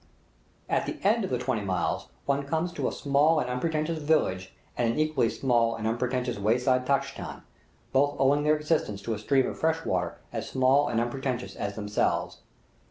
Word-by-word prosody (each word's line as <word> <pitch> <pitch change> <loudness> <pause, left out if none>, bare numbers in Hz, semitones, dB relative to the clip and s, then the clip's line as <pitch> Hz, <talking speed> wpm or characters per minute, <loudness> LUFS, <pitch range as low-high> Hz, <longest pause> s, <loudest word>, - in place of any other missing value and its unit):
At - - 0
the - - -4
end 220 +3 +3
of 190 - -2
the 125 - 0
twenty 125 -3 -1
miles 95 -3 -1 0.2
one 140 0 0
comes 160 +4 -1
to - - -1
a - - -1
small 150 +3 +3
and - - -1
unpretentious 155 +5 -1
village 95 -12 +1 0.2
and 115 -1 +1
an - - -3
equally 155 -6 +2
small 120 -3 +1
and 110 - -5
unpretentious 125 +1 -1
wayside 125 +4 +2
tchai 140 0 +1
khan, - - -7 0.5
both 145 +2 +3
owing 140 +2 +4
their 150 +1 +3
existence 150 -9 -1
to 115 - -2
a 105 - -4
stream 135 +4 +2
of - - -5
fresh 160 0 0
water 90 -1 -1 0.2
as - - -4
small 135 +2 +3
and 115 -1 0
unpretentious 125 +1 -3
as 100 0 -4
themselves. 105 -1 -1
130 Hz, 185 wpm, -27 LUFS, 115-150 Hz, 0.5 s, owing